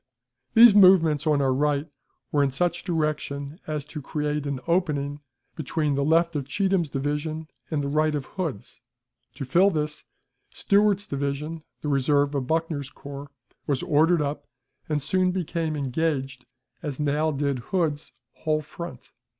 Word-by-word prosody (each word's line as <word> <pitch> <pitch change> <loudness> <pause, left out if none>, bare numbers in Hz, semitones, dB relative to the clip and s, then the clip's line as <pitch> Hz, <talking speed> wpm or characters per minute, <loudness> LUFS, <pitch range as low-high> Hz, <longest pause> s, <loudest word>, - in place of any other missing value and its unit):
These 230 -1 +9
movements 170 -6 +6
on 145 -2 +3
our 130 -1 +2
right 145 +2 +1 0.4
were 145 - +3
in 140 - +3
such 175 +6 0
direction 150 -3 -2
as 150 -2 -3
to 150 0 -7
create 150 0 -2
an 140 -2 -2
opening 150 -5 0 0.4
between 155 -1 -1
the 140 0 0
left 165 +2 +2
of 140 -3 -2
Cheatham's 190 0 +1
division 150 +3 -3 0.2
and 150 -3 -1
the - - -2
right 155 +1 +1
of 140 -2 -3
Hood's. 160 - -6 0.5
To 135 0 -5
fill 175 +10 +4
this, 150 -4 -3 0.5
Stewart's 205 -1 +2
division, 145 +3 -3 0.2
the - - -4
reserve 140 +1 +2
of 135 -3 -2
Buckner's 160 -3 -1
corps, 140 0 -9 0.4
was 140 -3 0
ordered 160 +2 +3
up, 145 0 -4 0.4
and 150 -1 +1
soon 185 +4 +2
became 170 -3 -2
engaged, 135 -2 -2 0.3
as 145 -4 -5
now 150 +2 +1
did 140 -3 -1
Hood's 155 +2 -2 0.2
whole 155 -1 -1
front. 170 +3 -9
150 Hz, 150 wpm, -25 LUFS, 140-165 Hz, 0.5 s, These